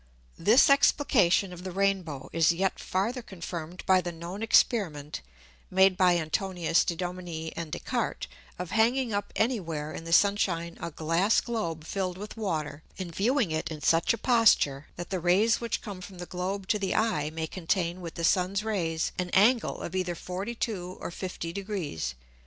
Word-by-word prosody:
This 230 +6 +6
Explication 215 - +4
of 180 0 -10
the 185 - -4
Rain 195 +1 +1
bow 145 -6 -8
is 165 0 +4
yet 190 +3 -1
farther 225 +7 -1
confirmed 175 -4 -7
by 185 -1 +5
the 175 0 -4
known 170 +4 -7
Experiment 175 - +2 0.5
(made 190 0 +5
by 180 -1 +4
Antonius 170 +1 +1
de 170 - -2
Dominis 175 -2 -5
and 165 -2 -5
Des - - -2
Cartes) - - -2 0.3
of 180 -1 -5
hanging 235 +1 +2
up 205 0 -2
any 235 +1 +1
where 155 -4 -5
in - - -6
the 165 - -7
Sun 200 +4 +5
shine 170 -4 -1
a - - -3
Glass 165 +7 +2
Globe 210 -10 -3
filled 185 +1 -3
with 210 +2 -8
Water, 155 -9 -3 0.2
and 180 -3 -6
viewing 230 - +1
it 155 0 -2
in 155 -2 -6
such 165 +3 +3
a 230 - 0
posture, 220 - +3
that 175 +1 -7
the 190 - 0
Rays 195 +8 +3
which 235 - -2
come 200 -5 -7
from 185 0 -10
the 175 - -6
Globe 185 +2 -4
to 210 - +2
the 195 -2 -1
Eye 210 -10 +1
may 160 +1 -3
contain 175 +1 -2
with 170 -2 -7
the 170 - -4
Sun's 185 +4 +2
Rays 170 -7 -1
an 180 -1 -1
Angle 230 +5 +3
of 175 - -5
either 180 -2 -1
42 185 0 -4
or - - -5
50 170 -2 -5
Degrees. 175 - -4
180 Hz, 185 wpm, -28 LUFS, 165-205 Hz, 0.5 s, This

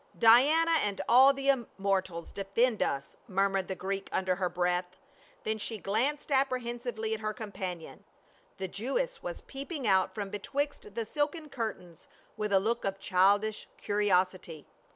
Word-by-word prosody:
"Diana 280 +9 +6
and 200 -1 -1
all 260 +3 +8
the 275 0 -1
immortals 195 -8 -1
defend 215 +4 0
us!" 140 0 -2
mur 195 -1 +2
mured 195 -1 -1
the 190 - -3
Greek 195 +1 -4
under 185 -1 0
her 180 -1 0
breath. 180 +1 -1 0.4
Then 220 0 -2
she 220 +1 -3
glanced 250 +10 -1
apprehensively 240 -4 -1
at 220 - -3
her 215 0 -2
companion. 190 -7 -6 0.5
The 190 - -3
Jewess 275 - -2
was - - -6
peering 280 0 -6
out 190 -2 +3
from 200 -2 -4
betwixt 270 0 -3
the 230 -1 -2
silken 300 +4 -2
curtains 200 - -6 0.3
with 210 -1 -3
a 195 - +5
look 230 +4 -1
of 195 0 -2
childish 205 +3 +2
curiosity. 185 -5 0
210 Hz, 150 wpm, -30 LUFS, 190-250 Hz, 0.5 s, all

